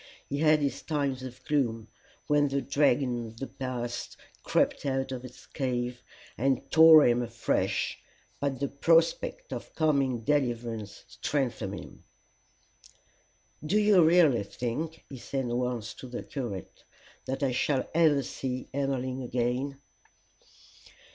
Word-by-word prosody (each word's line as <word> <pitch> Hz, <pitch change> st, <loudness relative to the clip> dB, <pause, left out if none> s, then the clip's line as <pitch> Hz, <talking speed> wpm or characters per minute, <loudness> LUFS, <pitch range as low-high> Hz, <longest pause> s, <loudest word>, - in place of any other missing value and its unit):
He 140 Hz, -, -3 dB
had 155 Hz, -1 st, +4 dB
his 140 Hz, -2 st, -1 dB
times 140 Hz, -4 st, -1 dB
of 130 Hz, 0 st, -9 dB
gloom, 115 Hz, -7 st, 0 dB, 0.4 s
when 145 Hz, -1 st, +3 dB
the 140 Hz, 0 st, 0 dB
dragon 130 Hz, -4 st, +1 dB
of 110 Hz, 0 st, -13 dB
the 135 Hz, -, -4 dB
past 125 Hz, -3 st, -5 dB, 0.2 s
crept -, -, +1 dB
out 135 Hz, -1 st, -1 dB
of 130 Hz, -1 st, -5 dB
its 125 Hz, 0 st, -12 dB
cave, 125 Hz, -2 st, -3 dB, 0.4 s
and 135 Hz, +1 st, 0 dB
tore 160 Hz, -1 st, +9 dB
him 120 Hz, 0 st, +3 dB
afresh; 115 Hz, -1 st, -1 dB, 0.4 s
but 140 Hz, -2 st, -2 dB
the 140 Hz, -, 0 dB
prospect 170 Hz, -, +1 dB
of -, -, -8 dB
coming 140 Hz, -6 st, +1 dB
deliverance 120 Hz, -6 st, -1 dB
strengthened 120 Hz, -5 st, -2 dB
him. -, -, -13 dB, 1.6 s
"Do 180 Hz, +7 st, +1 dB
you 205 Hz, -4 st, +5 dB
really 160 Hz, -, +5 dB
think," 125 Hz, +10 st, -4 dB
he 135 Hz, -, -9 dB
said 135 Hz, +2 st, -3 dB
once 120 Hz, -2 st, -2 dB
to 130 Hz, -, -10 dB
the 125 Hz, -, -6 dB
curate, 115 Hz, -, -6 dB, 0.4 s
"that 135 Hz, +2 st, -3 dB
I 135 Hz, -, +2 dB
shall 130 Hz, +2 st, 0 dB
ever 155 Hz, -4 st, +4 dB
see 130 Hz, 0 st, -5 dB
Emmeline 135 Hz, -2 st, -2 dB
again?" 125 Hz, +3 st, -2 dB
135 Hz, 130 wpm, -29 LUFS, 120-145 Hz, 1.6 s, tore